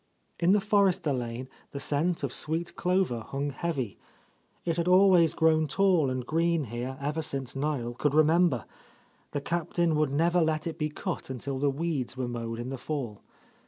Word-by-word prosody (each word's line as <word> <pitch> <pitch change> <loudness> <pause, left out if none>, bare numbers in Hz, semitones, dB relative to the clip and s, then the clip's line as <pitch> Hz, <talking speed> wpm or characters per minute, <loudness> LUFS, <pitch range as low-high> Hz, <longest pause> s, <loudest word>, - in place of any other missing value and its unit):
In 175 +2 +4
the 210 - +5
Forrester 195 -7 +2
lane 120 0 -4 0.3
the 140 - -4
scent 150 +4 0
of 135 - -2
sweet 165 +2 -2
clover 180 -9 +1
hung 140 +5 -3
heavy. 135 - -3 0.7
It 165 -1 0
had 170 0 0
always 180 -3 +6
grown 160 -1 +3
tall 180 -6 +3
and 130 -1 -3
green 165 +2 +1
here 125 +2 -5
ever 150 +3 -2
since 135 -4 -4
Niel 135 -4 -2
could 145 +4 0
remember; 155 - +4 0.6
the 145 - -3
Cap 170 +2 -2
tain 170 -2 +2
would 155 -1 +2
never 170 +4 +3
let 155 -1 0
it 165 -1 -4
be 150 0 0
cut 170 +2 -5
until 130 +1 -4
the 145 +1 +2
weeds 140 -3 -2
were 130 -1 -2
mowed 115 -1 -4
In 120 +2 -5
the 135 -1 -5
fall. 125 -10 -4
150 Hz, 180 wpm, -28 LUFS, 130-170 Hz, 0.7 s, always